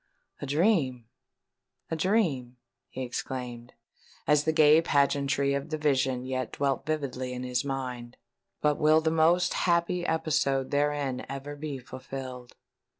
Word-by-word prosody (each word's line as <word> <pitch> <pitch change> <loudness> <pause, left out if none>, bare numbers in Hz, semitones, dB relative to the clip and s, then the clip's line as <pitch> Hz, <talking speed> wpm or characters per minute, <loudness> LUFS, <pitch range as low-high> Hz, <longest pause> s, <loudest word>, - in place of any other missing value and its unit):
"A 145 - -4
dream—a 145 - -2
dream!" 155 - 0 0.3
he 130 - -5
exclaimed, 125 -1 -5 0.5
as 150 0 +3
the 160 - +3
gay 155 0 +6
pageantry 140 -2 +2
of 140 0 -3
the 155 - -2
vision 135 -4 +1
yet 130 0 -3
dwelt 140 -1 -1
vividly 130 -5 -2
in 125 0 -5
his 125 0 -1
mind: 125 -3 -5 0.4
"but 150 -1 +2
will 155 +1 +5
the 160 0 +1
most 165 +2 +3
happy 175 0 +1
episode 155 -5 0
therein 145 -2 0
ever 140 +2 -6
be 145 -1 -5
fulfilled?" 130 -1 -8
140 Hz, 130 wpm, -28 LUFS, 130-155 Hz, 0.5 s, gay